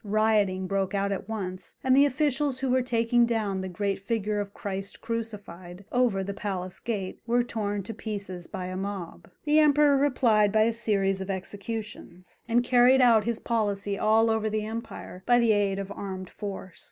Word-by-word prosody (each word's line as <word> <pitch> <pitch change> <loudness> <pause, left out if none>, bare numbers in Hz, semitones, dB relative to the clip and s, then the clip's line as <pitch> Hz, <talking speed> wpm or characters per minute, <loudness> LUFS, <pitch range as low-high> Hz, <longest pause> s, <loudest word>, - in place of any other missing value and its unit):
Rioting 210 -3 +2
broke 195 +1 -1
out 200 0 0
at 195 +1 -4
once, 185 -4 -5
and 260 0 +4
the 280 +1 +6
officials 285 -1 0
who 265 -1 -1
were 260 0 +3
taking 235 -1 +2
down 210 -5 -1
the 190 - -4
great 195 +2 -2
figure 210 0 -1
of 200 -1 -4
Christ 195 -1 -5
Crucified, 205 -5 -6
over 240 -6 +2
the 200 +1 -4
palace 185 -2 -4
gate, 200 -5 -4
were 240 +1 +3
torn 205 -4 -3
to 225 - -6
pieces 200 -6 -5
by 190 -3 -5
a 185 0 -5
mob. 195 -2 -6
The 300 +1 +4
Emperor 295 -1 +5
replied 240 -7 +3
by 215 +1 +4
a 230 +1 +2
series 195 -4 0
of 190 - -6
executions, 200 -1 -6
and 240 +1 +3
carried 250 +1 +5
out 230 -4 +5
his 235 -1 -1
policy 205 -4 -1
all 220 +2 +3
over 220 -1 0
the 215 0 -2
empire 220 -4 -7
by 245 0 +5
the 235 -2 +4
aid 200 -2 +1
of 195 0 -5
armed 190 -2 -6
force. 195 -3 -7
210 Hz, 185 wpm, -27 LUFS, 195-235 Hz, -, the